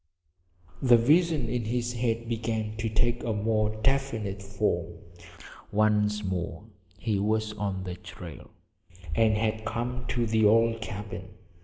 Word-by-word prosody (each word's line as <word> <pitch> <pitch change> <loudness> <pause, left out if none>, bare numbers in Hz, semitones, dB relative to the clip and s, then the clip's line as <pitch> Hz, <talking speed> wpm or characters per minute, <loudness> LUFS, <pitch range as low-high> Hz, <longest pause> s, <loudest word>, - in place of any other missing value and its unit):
The 125 -3 +7
visions 150 +2 +3
in 120 -1 -1
his 120 +1 -1
head 115 -1 -1
began 110 -2 -2
to 110 0 -1
take 120 +2 +1
a 115 - 0
more 110 0 +1
definite 115 -7 0
form. 100 -4 -1 0.8
Once 105 0 +2
more 90 -2 -3 0.3
he 105 -1 0
was 110 +1 0
on 100 -3 -3
the 90 -1 -4
trail, 90 - -10 0.6
and 110 +4 +4
had 110 0 0
come 120 +2 -3
to 120 -1 0
the 110 0 +2
old 115 +2 +4
cabin. 100 -3 -6
110 Hz, 135 wpm, -28 LUFS, 105-115 Hz, 0.8 s, The